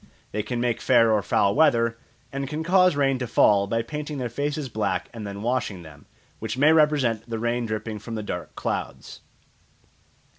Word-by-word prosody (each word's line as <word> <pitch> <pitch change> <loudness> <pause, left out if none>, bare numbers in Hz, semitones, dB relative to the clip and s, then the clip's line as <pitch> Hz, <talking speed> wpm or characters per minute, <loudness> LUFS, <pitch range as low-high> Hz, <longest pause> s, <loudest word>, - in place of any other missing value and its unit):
They 105 - -1
can 120 +3 -4
make 120 -1 -1
fair 115 -3 +4
or 105 -1 +3
foul 100 +1 +2
weather, 115 -7 +3 0.4
and 140 0 -3
can 155 +3 -4
cause 180 0 +4
rain 135 -2 +1
to 125 - -3
fall 100 -3 +4
by 115 +3 -1
painting 150 +3 -5
their 125 -2 -3
faces 145 +3 -3
black 110 -4 -2
and 110 -3 -6
then 100 +1 -7
washing 115 -7 -2
them, 75 -3 -15 0.3
which - - -4
may 150 +4 +5
represent 135 -8 +2
the 115 - -2
rain 120 +1 -1
dripping 110 0 -4
from 115 +2 -7
the 110 - -4
dark 90 -4 -6
clouds. - - -5
120 Hz, 185 wpm, -24 LUFS, 110-140 Hz, 0.4 s, may